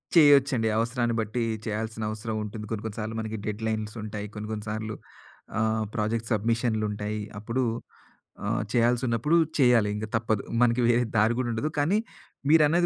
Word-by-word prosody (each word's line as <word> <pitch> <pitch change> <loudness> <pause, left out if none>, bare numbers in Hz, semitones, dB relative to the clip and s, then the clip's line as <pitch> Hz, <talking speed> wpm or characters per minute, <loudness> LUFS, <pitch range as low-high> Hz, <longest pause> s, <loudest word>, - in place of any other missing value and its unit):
చేయొచ్చండి. 140 -6 +6
అవసరాన్ని 115 0 0
బట్టి 110 +3 -2 0.2
చేయాల్సిన 110 0 -3
అవసరం 110 +1 -4
ఉంటుంది. 105 +1 -6
కొన్ని 110 -2 -3
కొన్ని 110 -2 -5
సార్లు 110 +1 -3
మనకి 110 0 -3
డెడ్‌లైన్స్ 110 0 -2
ఉంటాయి. 105 -1 -5
కొన్ని 105 0 -5
కొన్ని 105 0 -5
సార్లు 110 0 -3 0.6
ఆహ్, 110 0 +1
ప్రాజెక్ట్ 110 +1 -1
సబ్మిషన్లుంటాయి. 110 -1 0 0.2
అప్పుడు 115 +5 -1 0.9
ఆహ్, - - +1
చేయాల్సునప్పుడు 120 +5 +3 0.2
చేయాలి 120 -5 +5
ఇంక 105 - -3
తప్పదు. 110 -2 +1 0.2
మనకి 120 0 +4
వేరే 120 +1 +4
దారి 110 +2 +4
గూడా 130 -2 0
ఉండదు. 115 +7 -1
కానీ 165 +8 +3 0.5
మీరన్నది 160 +2 +5
110 Hz, 145 wpm, -27 LUFS, 110-120 Hz, 0.9 s, చేయొచ్చండి